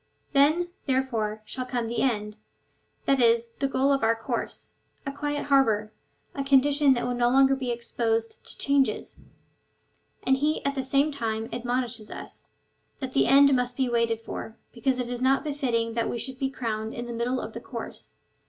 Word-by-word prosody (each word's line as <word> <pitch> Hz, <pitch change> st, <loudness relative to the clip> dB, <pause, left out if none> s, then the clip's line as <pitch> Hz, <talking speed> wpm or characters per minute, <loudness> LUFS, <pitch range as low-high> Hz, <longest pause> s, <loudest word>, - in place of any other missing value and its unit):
Then, 310 Hz, +5 st, +4 dB, 0.2 s
there 265 Hz, -1 st, +3 dB
fore, 215 Hz, -4 st, -3 dB
shall 255 Hz, +3 st, -5 dB
come 245 Hz, -2 st, -1 dB
the 235 Hz, +1 st, -2 dB
end 210 Hz, -5 st, 0 dB, 0.4 s
— -, -, -42 dB
that 275 Hz, -1 st, +3 dB
is, 230 Hz, 0 st, +3 dB
the 275 Hz, -, +1 dB
goal 270 Hz, +1 st, +2 dB
of 275 Hz, -, +1 dB
our 225 Hz, 0 st, +3 dB
course 225 Hz, 0 st, -4 dB, 0.2 s
— -, -, -40 dB
a 275 Hz, -, -2 dB
quiet 290 Hz, +1 st, -3 dB
harbour 220 Hz, -7 st, +2 dB, 0.2 s
— -, -, -42 dB
a 275 Hz, -, -2 dB
condition 275 Hz, 0 st, +4 dB
that 240 Hz, -, -2 dB
will 245 Hz, -, -1 dB
no 240 Hz, 0 st, +2 dB
longer 270 Hz, +1 st, +5 dB
be 260 Hz, -2 st, -4 dB
exposed 230 Hz, -1 st, -2 dB
to -, -, -9 dB
changes; 280 Hz, -1 st, +1 dB, 1.1 s
and 265 Hz, 0 st, +3 dB
he 300 Hz, +3 st, 0 dB
at 280 Hz, -, +1 dB
the 270 Hz, -, -2 dB
same 275 Hz, +3 st, +2 dB
time 225 Hz, -5 st, -3 dB
admonishes 240 Hz, -2 st, -2 dB
us, -, -, -9 dB, 0.5 s
that 260 Hz, -1 st, -5 dB
that 275 Hz, -, +2 dB
end 280 Hz, 0 st, +7 dB
must 250 Hz, 0 st, -1 dB
be 260 Hz, -2 st, +1 dB
waited 230 Hz, -1 st, +1 dB
for, 225 Hz, 0 st, -7 dB, 0.2 s
because 255 Hz, +2 st, 0 dB
it 250 Hz, -1 st, -2 dB
is 245 Hz, 0 st, -4 dB
not 265 Hz, +1 st, +3 dB
befitting 250 Hz, -7 st, -1 dB
that 230 Hz, 0 st, 0 dB
we -, -, -2 dB
should 260 Hz, +3 st, -5 dB
be 270 Hz, -, 0 dB
crowned 220 Hz, -4 st, -4 dB
in 240 Hz, -, -4 dB
the 240 Hz, -, -6 dB
middle 240 Hz, +2 st, -1 dB
of -, -, -6 dB
the -, -, -5 dB
course. -, -, -8 dB
250 Hz, 200 wpm, -26 LUFS, 230-275 Hz, 1.1 s, end